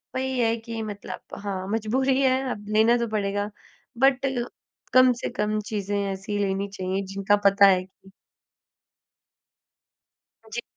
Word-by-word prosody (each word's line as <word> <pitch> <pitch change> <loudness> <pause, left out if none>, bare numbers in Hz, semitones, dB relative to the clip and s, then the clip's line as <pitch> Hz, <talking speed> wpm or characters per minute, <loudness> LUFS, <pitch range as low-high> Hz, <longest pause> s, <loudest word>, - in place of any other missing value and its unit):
वही 260 0 -1
है 230 -1 +2
कि 230 0 -6
मतलब 205 -3 -8
हाँ, 195 -2 -4
मजबूरी 255 +5 +1
है 260 -1 +3
अब 205 -2 -6
लेना 225 +2 +5
तो 235 -1 -1
पड़ेगा। 205 -1 -1 0.5
बट 270 +1 +3 0.7
कम 255 0 +7
से - - -2
कम 215 -3 -1
चीज़ें 205 -1 -2
ऐसी 195 +2 -4
लेनी 195 0 -1
चाहिए, 190 -1 -3
जिनका 195 +1 +1
पता 200 0 +7
है 185 -2 +4
कि 190 +1 -21 2.4
जी। 240 +2 -3
210 Hz, 135 wpm, -25 LUFS, 195-240 Hz, 2.4 s, कम